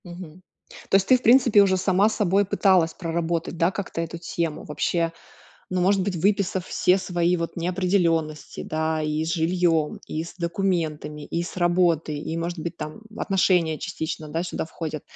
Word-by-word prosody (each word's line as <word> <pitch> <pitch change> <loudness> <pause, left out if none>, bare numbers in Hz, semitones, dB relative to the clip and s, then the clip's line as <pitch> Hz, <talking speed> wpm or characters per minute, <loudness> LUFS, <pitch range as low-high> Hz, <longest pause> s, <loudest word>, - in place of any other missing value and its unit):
Мгм. 175 -1 -10 0.5
То - - +3
есть 195 0 +3
ты, 255 - +6
в - - -15
принципе, 240 -3 +6
уже 190 -1 +3
сама 190 +3 +3
с - - -4
собой 200 0 +2
пыталась 185 -4 +3
проработать, 170 0 -2
да, 170 +2 +2
как-то 195 -4 -5
эту 165 +1 -5
тему, 165 -2 -3
вообще, 165 +3 -1 0.6
ну, 185 0 0
может 190 +2 +3
быть, 195 0 -2
выписав 190 0 0
все 180 +2 +2
свои 180 -1 0
вот 165 0 -4
неопределённости, 170 -3 0
да, 160 0 -1
и 155 +1 -1
с 165 - -2
жильём, 165 -2 +1
и 155 - -3
с 170 - -9
документами, 165 -5 -2
и 170 - -2
с 175 - -8
работы, 175 -3 +2
и, 160 +2 -4
может 170 +1 -3
быть, 170 +2 -5
там 155 +6 -7 0.2
отношения 180 -6 +2
частично, 160 -3 -5
да, 165 +3 -2
сюда 175 -2 -4
входят. 160 -2 -6
170 Hz, 175 wpm, -24 LUFS, 160-185 Hz, 0.6 s, ты